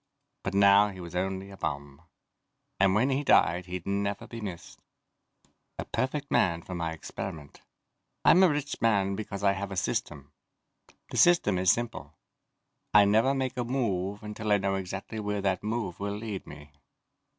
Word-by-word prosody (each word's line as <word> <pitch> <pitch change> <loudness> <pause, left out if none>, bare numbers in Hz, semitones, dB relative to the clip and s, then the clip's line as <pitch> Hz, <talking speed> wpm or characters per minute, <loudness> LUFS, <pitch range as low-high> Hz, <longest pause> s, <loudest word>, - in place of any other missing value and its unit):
But 95 - -4
now 100 +1 +6
he 95 -2 -8
was 85 -1 -8
only 95 +1 -2
a 95 - -11
bum, 70 -1 -5 0.8
and 95 0 +4
when 125 +6 +2
he 135 +2 0
died 90 - +3
he'd 90 -1 -5
never 100 0 -2
be 115 -1 -8
missed. 95 -5 -8 1.0
A - - -4
perfect 140 +2 -2
man 85 -2 +2
for 90 - -8
my 85 -2 -2
experiment. 80 -2 -7 0.6
I'm 180 - +7
a 185 - +7
rich 145 -1 -3
man 100 -4 +2
because 100 -1 -6
I 100 - +5
have 100 0 -4
a 95 - -5
system. 75 -5 -3 0.8
The - - -4
system 170 - +4
is 95 0 +3
simple: 115 -11 -1 0.8
I 105 -1 +8
never 110 +7 +3
make 130 -1 -2
a 125 - 0
move 105 -6 -2
until 105 0 -4
I 105 - +6
know 95 0 -1
exactly 95 +3 -5
where 105 -1 -2
that 95 -1 0
move 105 -4 -3
will 100 0 -3
lead 105 -3 -6
me. 75 0 -12
100 Hz, 170 wpm, -28 LUFS, 90-110 Hz, 1.0 s, I